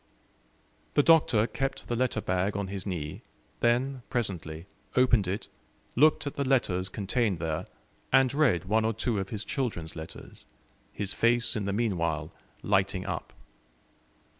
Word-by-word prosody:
The 145 - +5
Doctor 150 -9 +5
kept 135 +2 -3
the 120 - -1
letter 125 -2 0
bag 95 +2 0
on 100 -1 -3
his 100 0 -5
knee, 80 -6 -4 0.4
then, 125 +3 +1
presently, 90 -9 -3 0.3
opened 120 -6 +4
it, 95 +3 -3 0.5
looked 150 +3 +4
at 145 - -3
the 140 -2 -1
letters 100 -9 +1
contained 105 0 0
there, 80 +4 -3 0.4
and 135 -1 +5
read 135 - +3
one 110 +3 +2
or 110 +1 +1
two 110 0 -1
of 95 0 -4
his 110 -1 -4
children's 110 - -3
letters, 80 0 -9 0.5
his 100 -2 -3
face 120 0 +2
in 105 -3 -2
the 100 - -1
meanwhile 85 -8 -1 0.3
lighting 95 -1 +1
up. 85 -5 -4
105 Hz, 145 wpm, -29 LUFS, 90-125 Hz, 0.5 s, The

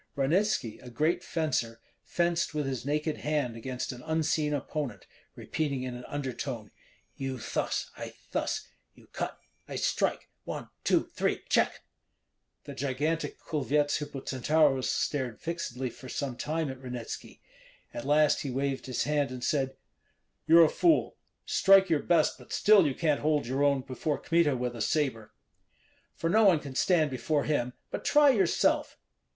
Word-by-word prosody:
Ranitski, 150 - +1
a 125 - -10
great 160 +9 0
fencer, 150 -10 -1 0.2
fenced 170 -2 0
with 150 -1 0
his 130 -3 -3
naked 150 +1 0
hand 145 -6 -1
against 125 +2 -4
an 125 -1 -9
unseen 155 -1 +1
opponent, 140 - -3 0.3
repeating 140 -5 -2
in 130 -1 -4
an 125 0 -8
undertone, 130 -5 -4 0.5
"You 135 -1 -3
thus, 110 - -2
I - - -8 0.2
thus; - - -2 0.3
you - - -18
cut, - - -3 0.3
I - - -6
strike, - - 0 0.2
one, - - -6
two, - - +3
three, - - -2
check!" - - +2 0.8
The - - -8
gigantic 145 +5 -2
Kulvyets 145 0 0
Hippocentaurus 140 0 +1
stared 130 -6 -1
fixedly 145 -7 -4
for 130 +2 -11
some 135 -3 -3
time 155 +2 -2
at 130 0 -10
Ranitski; 125 -3 -7 0.5
at 120 - -5
last 150 +2 +3
he 140 - -4
waved 135 0 -2
his 130 - -1
hand 145 -1 +1
and 130 -1 -7
said: 135 0 0 0.7
"You're 165 +1 +8
a - - +4
fool! 335 - +2 0.3
Strike 195 -2 +5
your 150 -3 +3
best, 170 -3 +2
but - - -15
still 205 -6 +5
you 135 - -2
can't 155 -4 +1
hold 150 -2 +1
your 130 +3 -1
own 140 -2 +3
before 135 +3 -2
Kmita 165 -5 +2
with 125 0 -2
a 115 - -5
sabre." 130 -6 0 0.8
"For 165 - -2
no 220 +6 +4
one 180 -6 +6
can 140 -3 -8
stand 155 +1 +2
before 140 +4 0
him; 125 -5 0 0.2
but - - -4
try 295 -1 +5
yourself." 195 -8 +2
145 Hz, 155 wpm, -29 LUFS, 130-160 Hz, 0.8 s, You're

